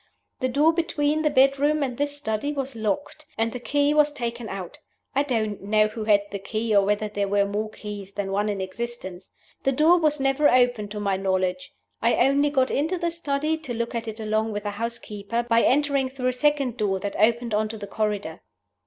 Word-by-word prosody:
The 255 - 0
door 295 +5 +4
between 310 -2 0
the 305 - +2
bedroom 280 +2 +3
and 255 -3 -2
this 290 +2 -2
study 220 +1 -2
was 275 -2 -4
locked, 225 +8 -3
and 225 +1 +1
the 250 - -5
key 290 +3 +1
was 300 -1 +4
taken 235 -4 -4
out. 190 -3 -7 0.3
I 275 - +3
don't 220 -7 -1
know 215 +2 +2
who 215 0 -5
had 205 -2 +5
the 200 - -4
key, 215 +2 -1
or 200 - +6
whether 210 +2 0
there 205 -1 -2
were 200 0 +2
more 210 +2 -2
keys 205 -2 -8
than 200 -1 -3
one 205 +2 0
in 200 -2 -2
existence. 190 -2 -6 0.3
The 270 - +2
door 320 +6 +5
was 305 -2 +1
never 270 +2 +3
opened 245 -4 +2
to 210 0 -5
my 200 -2 0
knowledge. 185 -1 -1 0.3
I 230 +2 +3
only 275 +3 +3
got 265 -3 +1
into 320 +6 0
the 340 -1 -1
study, 315 -1 -1
to 255 -7 -5
look 235 +1 -3
at 230 -1 -3
it 220 0 -6
along 215 0 -1
with 205 0 -4
the 205 - -2
housekeeper, 230 0 -4
by 230 -1 +3
entering 280 0 +2
through 255 -1 -1
a - - -1
second 275 -2 +1
door 195 -2 0
that 200 +1 -4
opened 230 +2 +2
on 215 +1 +1
to 220 - -6
the 205 - -6
corridor. 205 -5 -3
235 Hz, 215 wpm, -25 LUFS, 210-280 Hz, 0.3 s, or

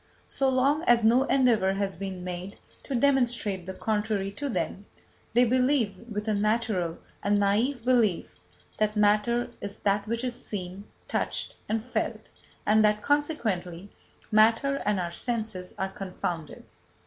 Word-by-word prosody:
So 270 -1 +1
long 270 +4 +2
as 235 -1 +5
no 240 +4 +5
endeavour 235 -9 +3
has 195 -1 -2
been 190 -2 -5
made 180 +2 -6 0.3
to 275 - -3
demonstrate 235 -8 +1
the 190 - -5
contrary 210 -2 -1
to 280 +8 -4
them, 205 -4 -3 0.5
they 245 +2 +5
believe, 250 -3 +2 0.2
with 210 +1 -4
a 215 - +2
natural 210 -5 0 0.2
and 205 +1 +2
naïve 225 +5 +1
belief, 235 -8 +2 0.5
that 215 0 +1
matter 210 +3 +2
is 200 0 -6
that 200 +1 +1
which 230 +2 -2
is 250 -1 -3
seen, 190 0 -6 0.2
touched - - -2
and 220 +1 -1
felt, 255 - -3 0.4
and 215 +1 +4
that, 210 0 +2
consequently, 205 - -1 0.4
matter 225 +6 +4
and 210 -2 +2
our 175 -1 -2
senses 215 -3 -3
are 190 - -1
confounded. 180 -5 -5
215 Hz, 145 wpm, -27 LUFS, 195-245 Hz, 0.5 s, as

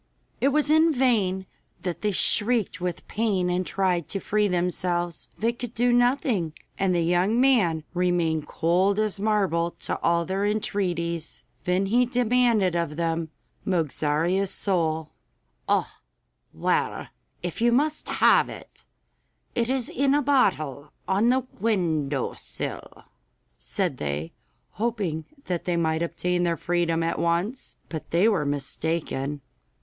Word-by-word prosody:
It 270 - +3
was 295 +1 +2
in 320 +1 +5
vain 215 -9 +1 0.4
that 175 -2 -3
they 210 - +1
shrieked 205 0 +1
with 180 -2 -4
pain 200 -5 0
and 180 +1 0
tried 180 -4 0
to 195 - -3
free 210 +1 +1
themselves. 175 -1 -1
They 230 +2 +1
could 240 -1 -7
do 245 +1 +3
nothing, 245 - +2 0.3
and 190 -2 +2
the 170 - +2
young 180 +7 +2
man 210 - +3
remained 175 -4 +1
cold 185 +5 +2
as 215 -2 +1
marble 195 -5 +1
to - - -2
all 170 0 +2
their 190 +2 -1
entreaties. 175 -6 -2 0.2
Then 180 +1 +1
he 240 +5 +3
demanded 240 -6 +2
of 170 -3 -1
them 165 0 -1 0.3
Mogarzea's 170 +2 0
soul. 160 -6 0 0.6
'Oh, - - +1 0.6
well, - - -1 0.3
if 175 +4 -4
you 240 0 +4
must 295 +5 0
have - - +4
it, - - -12 0.7
it 235 0 0
is 260 -2 0
in 275 +2 +1
a 295 - +3
bottle 155 - +1
on 205 +5 +3
the 260 0 +2
window 160 - 0
sill,' - - -6 0.6
said - - -2
they, 75 +2 -3 0.4
hoping 200 -8 -2 0.2
that 175 -2 -3
they 175 -1 0
might 160 -1 +1
obtain 175 +1 -1
their 170 -1 +1
freedom 170 -1 0
at 165 - -1
once. 175 +9 -1
But 160 -2 -7
they 175 +6 +3
were 190 -10 +2
mistaken. 145 0 -2
180 Hz, 135 wpm, -25 LUFS, 170-225 Hz, 0.7 s, in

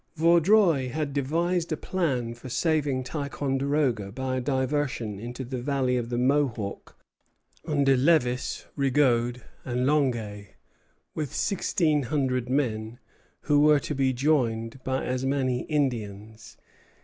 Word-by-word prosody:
Vaudreuil 170 -3 +4
had 145 +2 -3
devised 165 +5 0
a 155 - 0
plan 135 -12 -1
for 120 +2 -10
saving 145 -1 0
Ticonderoga 140 -5 -1
by 130 +2 -3
a - - -1
diversion 130 -5 -1
into 120 +4 -6
the 125 0 -5
valley 130 -1 0
of 120 -2 -2
the 120 - -2
Mohawk 125 -6 -1 0.7
under 140 -3 +3
Lévis, 125 -3 +1
Rigaud, 125 -3 +2 0.2
and 125 0 -1
Longueuil, 120 -8 0 0.7
with 150 -4 -4
sixteen 160 -6 +1
hundred 130 -2 -1
men, 115 -4 -1 0.4
who 145 -1 +2
were 150 0 +5
to 150 - -4
be 135 -2 +1
joined 125 -3 0
by 130 0 -1
as 125 0 -2
many 135 -2 0
Indians. 110 -7 -3
130 Hz, 125 wpm, -26 LUFS, 120-145 Hz, 0.7 s, were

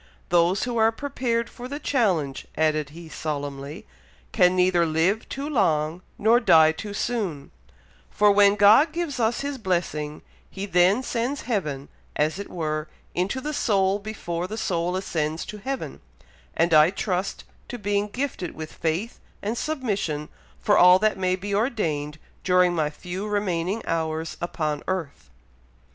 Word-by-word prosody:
"Those 175 +2 +3
who 245 -1 -2
are 225 0 +4
prepared 235 -2 -2
for 245 0 -9
the 285 +3 -5
change," 190 - 0
added 155 -2 +1
he, 165 +3 -11
solemnly, 145 -2 -5 0.5
"can 180 +1 +4
neither 180 -1 +3
live 165 +7 +1
too 275 +2 -4
long, 165 - +1 0.2
nor 225 +3 +4
die 160 -8 +6
too 205 +5 -7
soon; 200 -13 -3 0.6
for 210 0 +4
when 200 0 +5
God 215 +10 +6
gives 330 -7 -3
us 230 +1 +1
His 280 -1 -4
blessing, 170 -6 -2 0.3
He 195 +1 -5
then 190 +5 +3
sends 250 +4 -2
heaven, 150 - -2 0.3
as 155 +5 0
it 200 - -6
were, 155 -2 -3 0.3
into 190 +9 -1
the 300 +3 -4
soul 195 -6 +2
before 180 -5 -4
the 215 +3 -6
soul 175 -3 -1
ascends 160 -4 -2
to 210 - -8
heaven; 260 - -5 0.6
and 165 0 +2
I 155 +1 +7
trust 190 -1 -2 0.2
to 245 - -6
being 205 -1 0
gifted 240 -5 -4
with 155 0 -7
faith 170 +9 -2 0.2
and 215 +3 -1
submission 205 - -2 0.3
for 205 - +3
all 180 +1 +8
that 215 +2 +2
may 185 -1 +1
be 200 +2 -5
ordained 165 - -1 0.3
during 180 -1 +4
my 155 -3 0
few 180 +6 -6
remaining 200 0 -1
hours 160 0 -2
upon 155 -4 -2
earth." 160 - -4
185 Hz, 150 wpm, -25 LUFS, 160-220 Hz, 0.6 s, all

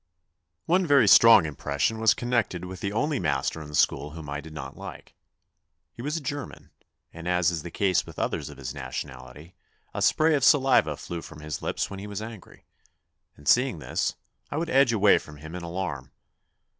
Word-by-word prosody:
One 180 +1 +2
very 140 -6 +5
strong 115 -3 +8
impression 75 +8 -2
was 110 -1 +4
connected 120 -7 -1
with 90 0 -8
the 100 - -3
only 145 +7 0
master 75 -1 -1
in 75 - -8
the 75 - -7
school 75 0 +1
whom 80 -3 -8
I 70 0 -3
did 80 +2 -12
not 80 - -8
like. - - -10 0.8
He - - -9
was 150 +5 -2
a - - -5
German, 145 0 -6 0.4
and 85 +1 -8
as 90 -1 +2
is 85 -3 -3
the 85 - -7
case 95 +1 +1
with - - -13
others - - -2
of 75 - -12
his 65 0 -6
nationality, 65 +3 -8 0.4
a - - -4
spray 160 +1 +3
of 140 -3 +1
saliva 130 - +4
flew 85 -1 -6
from 80 -2 -11
his 75 -1 -5
lips - - -2
when 100 - -6
he 100 - -7
was 100 -1 -5
angry, 110 -3 -10 0.7
and 75 - -14
seeing 125 - +4
this, 75 - -2 0.3
I 145 - -4
would 165 +1 -2
edge 135 -2 +5
away 105 -3 +5
from 75 -1 -13
him 80 +2 -10
in 90 - -5
alarm. 85 -6 -5
90 Hz, 195 wpm, -26 LUFS, 75-120 Hz, 0.8 s, strong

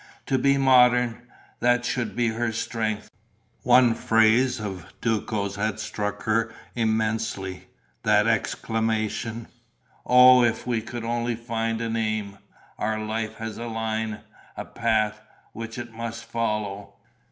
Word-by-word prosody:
To 130 - +1
be 140 0 +3
modern: 125 -2 +4 0.3
that 120 0 +2
should 125 -1 -2
be 120 -1 +2
her 115 +1 -1
strength. 110 -1 -3 0.5
One 125 -1 +5
phrase 115 +3 +3
of 95 -5 -6
Duco's 105 -3 -1
had 110 +1 -1
struck 105 -1 -4
her 115 +1 +1 0.2
immensely, 110 -4 -1 0.3
that - - +3
exclamation: 110 0 -1 0.6
"Oh, 125 0 +7
if 120 -1 0
we 120 -2 0
could 115 +1 -7
only 120 +1 -1
find 115 -1 -2
an 115 0 -2
aim! 110 -3 -2 0.4
Our 110 +1 -1
life 110 0 -3
has 110 0 -6
a 120 - -5
line, 110 -1 -3 0.4
a - - -5
path, 110 -2 0 0.3
which 115 +1 -7
it 120 -1 -7
must 115 +1 -6
follow...." 105 -3 -3
115 Hz, 130 wpm, -25 LUFS, 110-120 Hz, 0.6 s, Oh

